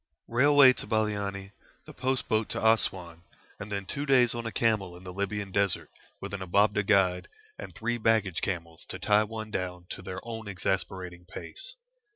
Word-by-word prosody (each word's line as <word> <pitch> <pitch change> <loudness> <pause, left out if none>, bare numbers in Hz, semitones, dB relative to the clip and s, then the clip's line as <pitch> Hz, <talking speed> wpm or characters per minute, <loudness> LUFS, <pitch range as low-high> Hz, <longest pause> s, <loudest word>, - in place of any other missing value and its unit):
Railway 140 +2 +6
to - - -8
Baliani, 100 -3 -1 0.3
the - - -11
post 130 0 -1
boat 110 0 +1
to - - -4
Assouan, 95 -7 +1 0.4
and 105 0 -7
then 100 -1 -2
two 140 +9 -4
days 125 -3 +5
on 115 -1 -4
a - - -3
camel 105 -7 0
in 90 - -14
the 90 -1 -8
Libyan 100 +1 -3
desert, 100 -1 0 0.3
with 100 0 -7
an 100 - -4
Ababdeh 100 +2 +2
guide, 95 -3 +3 0.3
and - - -8
three 120 +1 -2
baggage 110 -6 +2
camels 85 -4 -4
to - - -5
tie 105 0 +3
one 110 0 -6
down 90 -2 -4
to - - -5
their 90 0 -6
own 115 -2 -6
exasperating 90 -2 -3
pace. - - -6
100 Hz, 180 wpm, -29 LUFS, 95-115 Hz, 0.4 s, Railway